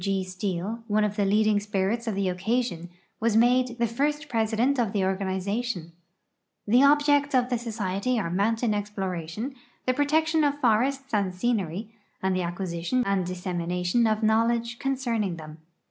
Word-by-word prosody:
W. - - -9
G. 195 0 0
Steel, 190 +4 -3
one 215 0 +2
of 210 -1 -1
the 205 -2 +1
leading 210 +1 +3
spirits 210 +3 -1
of 220 - -1
the 195 -1 0
occasion, 180 -2 -1 0.3
was 220 -1 +2
made 245 +1 +3
the 235 - +2
first 295 +6 -1
president 230 +3 +1
of 225 -5 0
the 195 -3 +1
organization. 190 0 -2 0.7
The 240 +5 +4
objects 290 0 +4
of 250 -1 +2
the 245 - +1
society 220 0 -2
are 170 -5 -2
mountain 220 +4 +1
exploration, 205 - -4 0.3
the 255 - +2
protection 315 +3 +2
of 290 0 +1
forests 265 +3 +1
and 195 -3 0
scenery, 205 -1 -2 0.3
and 190 0 0
the 185 - 0
acquisition 175 +6 -1
and 195 -2 0
dissemination 180 +4 0
of 215 0 0
knowledge 230 +2 +1
concerning 235 -8 -1
them. 155 -1 -10
215 Hz, 160 wpm, -26 LUFS, 190-245 Hz, 0.7 s, The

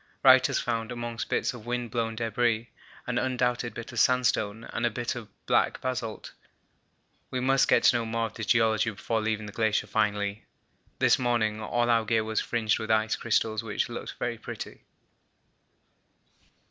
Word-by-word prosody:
Wright - - +7
has - - 0
found, 115 -1 -2
amongst 120 -1 -4
bits - - 0
of 120 -2 -11
wind 120 -1 -2
blown 115 -2 -1
debris, 115 0 0 0.3
an 125 -1 0
undoubted 125 -1 -1
bit 120 - -7
of - - -3
sandstone 115 -4 +2
and - - -2
a 120 - +3
bit 120 +1 -3
of 120 -4 -7 0.2
black - - +2
basalt. 125 -4 -4 1.0
We 130 - -2
must 135 +1 +3
get - - +4
to 120 - +6
know 115 - -2
more 115 0 -1
of 110 - -6
the 115 - -6
geology 110 0 +3
before 110 +2 -2
leaving 110 0 -1
the 105 - -7
glacier 110 0 +1
finally. 105 -1 -1 0.5
This - - +4
morning 115 -3 0
all 120 +3 0
our 115 -1 +3
gear 110 +1 +1
was 110 0 -1
fringed 110 -3 0
with 110 - -5
ice 110 0 +2
crystals 110 -1 0
which 110 -2 -2
looked - - -6
very - - -3
pretty. - - -8
115 Hz, 170 wpm, -28 LUFS, 110-120 Hz, 1.0 s, Wright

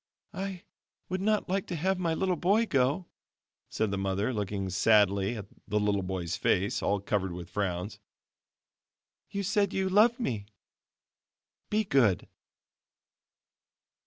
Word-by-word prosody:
"I 190 -2 -5 0.5
would 185 +1 -2
not 215 +1 +1
like 195 +1 -1
to 175 - -3
have 185 +4 0
my 165 -3 0
little 185 +1 +1
boy 205 +7 +3
go," 140 - +1 0.6
said 110 -2 -1
the 100 - -1
mother, 100 +5 0
looking 100 -3 -2
sadly 100 +1 +3
at 100 - -6 0.2
the 105 +1 +1
little 105 -1 +1
boy's 90 -3 -3
face, 95 +3 +1
all 100 - +1
covered 95 -1 -1
with 90 0 -8
frowns; 100 +1 -2 1.3
"you 200 0 -3
said 200 +1 +1
you 190 0 +1
loved 225 +6 +4
me 110 - -2 1.2
be 215 +1 +2
good." 125 - +2
115 Hz, 130 wpm, -29 LUFS, -, 1.3 s, loved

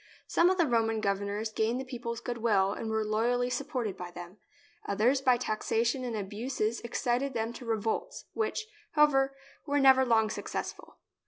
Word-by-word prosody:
Some 345 - +4
of 375 - +1
the 340 - +4
Roman 225 -4 +1
governors 200 +2 -1
gained 220 +3 0
the 265 - -5
people's 235 -3 -5
goodwill 220 -5 +1
and 225 - -5
were 220 0 0
loyally 240 +3 +1
supported 250 -5 -2
by 180 -1 -7
them; 175 +2 -10 0.5
others 235 +7 +2
by 255 -2 +4
taxation 235 +2 0
and 240 -2 -3
abuses 215 +3 -2
excited 245 +2 -1
them 225 +1 -1
to 240 0 -9
re 225 -1 +1
volts, 220 +1 -3
which, 440 0 -1 0.3
however, 275 -3 +4 0.3
were 285 0 +1
never 265 -1 +7
long 220 -3 +3
successful. - - -5
235 Hz, 165 wpm, -30 LUFS, 215-260 Hz, 0.5 s, never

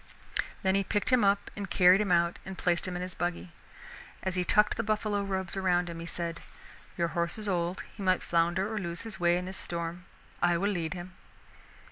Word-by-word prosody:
Then 190 0 +3
he 195 0 +2
picked 205 +5 0
him 250 -3 +5
up 200 0 +2
and 200 -2 -5
carried 180 +2 +6
him 205 -3 0
out 170 0 +3
and 190 -1 -7
placed 175 +1 +1
him 180 - -3
in 180 - -2
his 180 -1 -4
buggy. 175 0 -3 0.7
As 190 - -1
he 180 0 +1
tucked 210 +4 +4
the - - 0
buffalo 215 -2 0
robes 190 -2 -2
around 180 -2 +1
him 165 - -7
he 165 - -6
said: 170 -1 -2 0.6
"Your 170 -1 +1
horse 170 +3 -1
is 215 -1 -5
old, 175 -1 -1
he - - -9
might 185 -1 +2
flounder 175 +5 +1
or 215 - -1
lose 170 -1 -3
his 215 -5 -7
way 175 0 +4
in 180 - -3
this 190 +1 -6
storm. 170 +1 -4 0.4
I 175 -1 +4
will 200 +4 +1
lead 170 -3 -2
him." 180 +1 -8
180 Hz, 215 wpm, -30 LUFS, 170-195 Hz, 0.7 s, carried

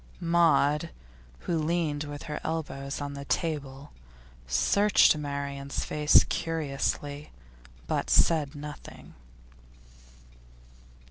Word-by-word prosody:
Maud, 165 -3 +3 0.5
who 170 -2 -1
leaned 155 -2 -1
with 145 0 -7
her 150 -1 -5
elbows 145 -4 -4
on 145 0 -4
the 140 0 -7
table, 145 -4 -3 0.6
searched 200 - +4
Marian's 140 -1 -4
face 150 0 +5
curiously, 145 -2 -3 0.6
but - - -2
said 155 -3 +3
nothing. 145 0 -10
150 Hz, 85 wpm, -28 LUFS, 140-160 Hz, 0.6 s, face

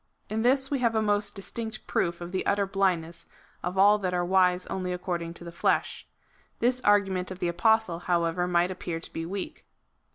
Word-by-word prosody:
In 220 +1 0
this 265 +3 +2
we 280 - +1
have 235 -2 +1
a 220 - +3
most 205 0 0
dis 195 - -5
tinct 220 -2 -5
proof 170 0 -1
of 175 0 -6
the 185 - -1
utter 200 0 +2
blindness 180 -4 -1 0.3
of 180 +2 -4
all 205 +2 +6
that 185 -2 -1
are 175 0 0
wise 180 0 +3
only 185 -1 -3
according 175 -2 -3
to 170 - -10
the 170 - -8
flesh. 170 - 0 0.5
This 250 +1 +1
argument 195 -4 +2
of 185 - -6
the 180 - -1
Apostle, 220 0 +2
how 175 -1 +1
ever, 170 +2 0
might 175 +1 +2
appear 175 -3 -4
to - - -8
be 165 0 -4
weak. 195 +1 -5
185 Hz, 205 wpm, -27 LUFS, 175-205 Hz, 0.5 s, all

